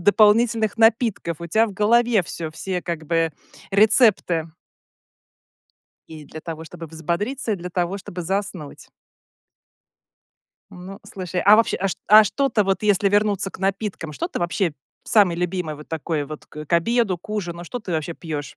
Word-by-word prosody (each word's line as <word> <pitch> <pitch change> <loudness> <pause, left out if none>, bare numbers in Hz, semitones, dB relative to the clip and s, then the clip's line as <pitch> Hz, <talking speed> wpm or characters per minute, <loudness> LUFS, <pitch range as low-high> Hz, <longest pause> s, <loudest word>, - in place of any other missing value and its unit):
дополнительных 215 +3 +3
напитков, 225 -7 +2
у 170 - -5
тя 220 +6 +3
в 205 - -7
голове 225 0 +3
всё, 165 -1 -6
все 180 +3 -4
как 165 -2 -4
бы 165 -1 +1 0.4
рецепты. 200 -6 +3 1.6
И 155 -2 -10
для 155 +3 -10
того, 160 0 -7
чтобы 165 0 -9
взбодриться, 170 - -3
и 205 - -1
для 180 +1 -7
того, 180 +3 -1
чтобы 180 -1 -7
заснуть. 185 -4 -4 1.8
Ну, 185 +2 -10
слушай, 185 -1 -4
а 205 +3 +7
вообще 230 - +2
а 195 - 0
чт - - -3
а 215 +1 +9
что-то 250 0 +1
вот, 195 +2 0
если 205 -1 +3
вернуться 205 -1 +1
к - - -12
напиткам, 195 -4 -3
что 135 - -4
ты - - -5
вообще 175 -1 -1 0.3
самое 195 -6 +3
любимое 180 -3 -2
вот 150 - -13
такое 160 -2 -3
вот 155 +1 -9
к 150 0 -9
к - - -9
обеду, 200 +2 +2
к 175 - -19
ужину, 175 -5 -4
что 245 - -5
ты 195 -7 -6
вообще 160 +1 -2
пьешь? 150 -4 -6
185 Hz, 165 wpm, -22 LUFS, 165-210 Hz, 1.8 s, а